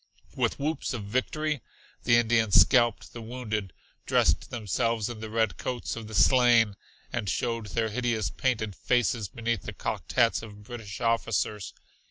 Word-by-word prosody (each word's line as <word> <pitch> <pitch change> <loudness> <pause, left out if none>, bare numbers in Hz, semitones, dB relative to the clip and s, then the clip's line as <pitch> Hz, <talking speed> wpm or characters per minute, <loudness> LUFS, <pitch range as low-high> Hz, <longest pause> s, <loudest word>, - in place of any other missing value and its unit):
With - - 0
whoops 150 -1 -2
of 110 - -5
victory 140 +6 -1 0.4
the 120 - +5
Indians 115 -3 +4
scalped 120 -4 +3
the 120 - -7
wounded, 110 -4 -4 0.4
dressed - - +2
themselves 115 0 -1
in 115 - -8
the 110 0 -6
red 110 0 0
coats 125 -2 -3
of 115 -2 -7
the 110 - -7
slain 120 -5 +5 0.4
and 115 -5 -2
showed 115 0 -2
their 110 +2 -1
hideous 115 -2 -1
painted 110 -6 -1
faces 120 -3 +1
beneath 115 +3 -2
the - - -7
cocked - - -4
hats 115 -2 +3
of 105 -2 -11
British 110 -2 -8
officers. 115 -3 -1
115 Hz, 155 wpm, -28 LUFS, 110-120 Hz, 0.4 s, the